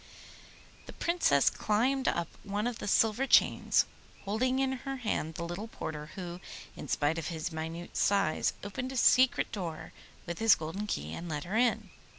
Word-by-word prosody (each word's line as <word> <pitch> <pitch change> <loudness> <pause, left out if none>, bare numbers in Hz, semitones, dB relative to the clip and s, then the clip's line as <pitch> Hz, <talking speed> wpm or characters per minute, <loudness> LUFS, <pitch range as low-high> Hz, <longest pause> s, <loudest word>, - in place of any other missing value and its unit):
The - - -9
Princess 325 - +3
climbed 255 +6 +1
up 170 -1 +1 0.2
one 205 +1 -2
of 240 -2 -2
the - - -5
silver 225 +6 +3
chains, - - +4 0.4
holding 250 +6 +1
in 270 0 +1
her 270 0 -4
hand 210 -10 -2
the 170 - -4
little 175 +6 -5
porter 150 -8 -6
who, 175 -2 -6 0.4
in - - -8
spite 150 +3 +1
of 160 - -4
his 165 0 -4
minute 160 +2 -6
size, 195 -6 +2
opened 250 +6 -4
a 265 - -4
secret 255 +1 +4
door 175 -7 -5 0.3
with 170 -1 -5
his 225 -1 +6
golden 165 +7 -5
key 75 - -3
and 170 0 -6
let 150 -2 -3
her 190 +5 -4
in. 240 +1 +1
200 Hz, 170 wpm, -31 LUFS, 165-240 Hz, 0.4 s, his